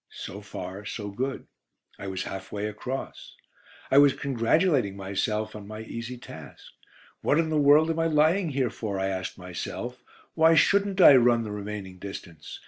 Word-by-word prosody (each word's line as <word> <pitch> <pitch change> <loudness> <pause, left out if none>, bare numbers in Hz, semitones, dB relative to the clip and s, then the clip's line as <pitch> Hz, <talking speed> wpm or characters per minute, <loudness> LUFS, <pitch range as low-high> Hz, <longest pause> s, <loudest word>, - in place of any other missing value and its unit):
So 100 - -8
far, 95 -1 -7
so 105 0 -5
good: 130 +7 -4 0.5
I 100 - -6
was 95 -1 -3
half 95 0 -7
way 105 0 -3
across. 125 +5 -6 0.6
I 135 - +7
was 145 -2 +6
congratulating 135 - +1
myself 105 +3 -2
on 105 -1 -9
my 110 +1 -7
easy 115 +2 -6
task. 80 - -12 0.5
"What 145 - +2
in 165 -1 +1
the 155 -1 +2
world 150 +3 +5
am 165 - -3
I 165 - +2
lying 160 +4 +3
here 130 -5 0
for?" 105 -5 -4
I 95 0 0
asked 95 -1 -4
myself; 95 +7 -6 0.3
"why 160 0 +5
shouldn't 200 +3 +3
I 145 - +10
run 120 -1 +4
the 105 - -6
remaining 100 -2 -6
distance?" 90 -5 -9
115 Hz, 170 wpm, -26 LUFS, 100-145 Hz, 0.6 s, I